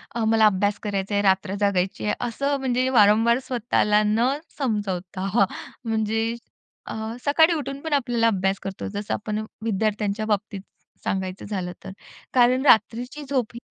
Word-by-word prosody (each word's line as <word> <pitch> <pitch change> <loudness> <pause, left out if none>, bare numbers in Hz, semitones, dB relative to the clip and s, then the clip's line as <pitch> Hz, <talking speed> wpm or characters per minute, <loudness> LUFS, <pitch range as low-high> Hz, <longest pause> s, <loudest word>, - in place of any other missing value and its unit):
अ, 235 - -1
मला 220 0 +4
अभ्यास 205 0 +2
करायचा 200 -1 -2
आहे, 200 - +3
रात्र 190 0 +2
जगायची 195 -2 0
आहे. 210 - +1
असं 280 +5 -1
म्हणजे 255 -1 0
वारंवार 225 0 +5
स्वतःला 225 -4 +2
न 220 +4 +2 0.3
समजवता 200 -7 -2
हां. 210 -3 +5 0.4
म्हणजे 225 +1 0 0.5
अ, - - -6 0.3
सकाळी 320 +4 +5
उठून 275 -3 -4
पण 320 -1 -3
आपल्याला 240 -4 +2
अभ्यास 195 -2 0
करतो. 195 -1 -5
जसं 205 0 -3
आपण 215 0 -3 0.2
विद्यार्थ्यांच्या 215 0 -1
बाबतीत 205 -2 -2 0.4
सांगायचं 190 0 -3
झालं 190 -4 -3
तर. 190 - -7 0.4
कारण 255 +2 +4
रात्रीची 245 +4 +3
झोप 255 -5 -1
ही, 235 - -8
215 Hz, 150 wpm, -24 LUFS, 200-245 Hz, 0.5 s, वारंवार